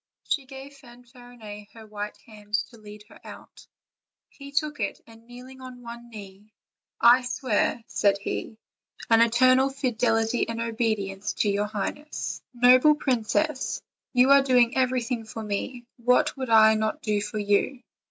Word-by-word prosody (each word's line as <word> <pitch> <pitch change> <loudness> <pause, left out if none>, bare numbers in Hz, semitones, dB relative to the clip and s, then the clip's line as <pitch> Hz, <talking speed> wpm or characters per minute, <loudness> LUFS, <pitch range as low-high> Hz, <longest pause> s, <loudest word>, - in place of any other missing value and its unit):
She 275 - -2
gave 270 +1 -11
Fan 245 -2 -16
farinet 240 -4 -12
her 225 -1 -12
white 210 -1 -7
hand 210 -3 -6 0.2
to 235 - -15
lead 210 0 -12
her - - -16
out; - - -13 0.6
he 280 0 -12
took 295 0 -1
it, 200 -2 -3
and 225 0 -18
kneeling 255 +2 -12
on 250 -1 -11
one 235 0 -10
knee: 205 -1 -12 0.5
"I 240 +2 +6
swear," 245 -2 -1
said 200 -4 +1
he, 205 +2 -5 0.5
"an 225 0 +6
eternal 255 +3 +4
fidelity 240 -4 0
and 230 0 -4
obedience 215 -4 -2
to 205 - 0
your 205 +1 -1
highness. 215 +8 -5
Noble 255 +4 +5
princess, 260 +2 -1 0.3
you 255 +2 +4
are 280 0 +7
doing 250 -3 +3
everything 255 -2 0
for 220 0 -8
me; 240 +4 -4 0.2
vhat 250 +5 +3
would 260 -3 -5
I 220 -1 +6
not 220 0 -2
do 210 -2 0
for 210 +1 -5
you?" 205 +5 0
235 Hz, 150 wpm, -25 LUFS, 215-255 Hz, 0.6 s, are